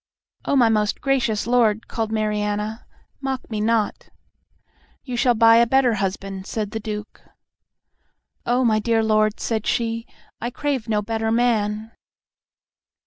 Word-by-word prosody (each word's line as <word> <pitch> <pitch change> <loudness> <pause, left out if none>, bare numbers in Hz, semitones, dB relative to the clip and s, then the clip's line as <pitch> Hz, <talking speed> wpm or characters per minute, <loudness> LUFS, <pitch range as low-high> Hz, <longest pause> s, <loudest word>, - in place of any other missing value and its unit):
"O - - +1
my 245 -4 +5
most 210 -2 +1
gracious 255 -6 0
lord," 230 -3 +2
cried 225 -2 -3
Mariana, 210 0 -2 0.3
"mock 265 -2 -3
me 215 -1 -2
not!" 220 -1 0 0.9
"You 250 -3 -5
shall 240 0 +3
buy 225 +1 +6
a 235 0 +5
better 260 -1 +3
husband," 195 -1 -3
said 210 -2 -3
the 220 - -3
Duke. 210 -1 -7 1.2
"O 245 +1 +1
my 215 -2 +3
dear 225 0 +1
lord," 215 -1 +2
said 220 -2 -2
she, 230 0 -1 0.3
"I 240 - -2
crave 260 -3 -3
no 210 -1 +1
better 225 +1 -1
man." 220 -2 0
225 Hz, 140 wpm, -22 LUFS, 210-240 Hz, 1.2 s, buy